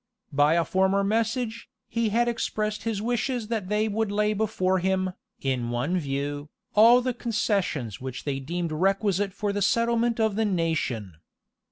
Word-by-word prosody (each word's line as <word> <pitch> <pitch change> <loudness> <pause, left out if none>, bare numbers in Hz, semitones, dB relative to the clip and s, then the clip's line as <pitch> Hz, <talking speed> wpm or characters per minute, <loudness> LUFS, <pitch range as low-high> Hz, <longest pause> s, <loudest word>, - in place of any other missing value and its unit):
[*] - - -60
By 145 +3 +4
a 170 -1 +2
former 190 +1 +2
message, 225 +2 -1 0.2
he 230 -1 0
had 235 +3 +2
expressed 215 -2 -2
his 215 -2 -1
wishes 240 -1 -1
that 215 -5 -2
they 210 +1 +1
would 220 0 -1
lay 210 +1 +1
before 190 -3 +1
him, 185 0 0 0.3
in 130 -3 -1
one 135 +10 0
view, 145 0 -3 0.2
all 230 +4 +7
the 255 0 -1
concessions 200 - -1
which 130 -1 -6
they 140 -2 -2
deemed 170 +4 -3
requisite 195 +3 +1
for 205 +1 -2
the 205 - -2
settlement 235 +2 +2
of 220 -2 +2
the 220 +1 +1
nation. 160 - -1
200 Hz, 165 wpm, -26 LUFS, 165-225 Hz, 0.3 s, all